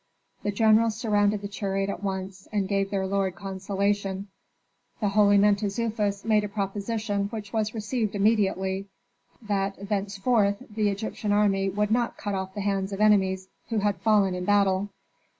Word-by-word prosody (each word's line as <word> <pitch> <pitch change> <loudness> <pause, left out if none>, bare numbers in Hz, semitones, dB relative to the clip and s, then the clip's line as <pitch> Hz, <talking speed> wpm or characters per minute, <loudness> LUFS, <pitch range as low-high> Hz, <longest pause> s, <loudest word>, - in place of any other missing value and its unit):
The - - -2
generals 220 +1 +4
surrounded 205 -2 +1
the - - -2
chariot 195 -1 -2
at 200 - -4
once 190 -1 -4
and 205 -2 0
gave 195 -1 0
their 195 -1 -1
lord 190 -1 0
consolation. 195 +1 -2 0.7
The 210 - +1
holy 205 0 +5
Mentezufis 205 0 +1
made 215 -2 +3
a 210 - -3
proposition 205 +1 -2
which 210 -2 -7
was 215 0 -1
received 215 0 -2
immediately, 195 -2 +1 0.6
that 200 -1 -2
thenceforth 200 +1 +1
the 210 -1 +1
Egyptian 205 +1 -3
army 195 -2 +2
would 210 +2 -1
not 235 +1 +1
cut 205 - -3
off 190 0 -4
the 205 - -3
hands 195 -1 -1
of 195 - -4
enemies 190 -3 +3 0.2
who 225 - -1
had 205 -1 +1
fallen 205 -4 +3
in 180 0 -3
battle. 200 0 +2
200 Hz, 155 wpm, -26 LUFS, 195-210 Hz, 0.7 s, holy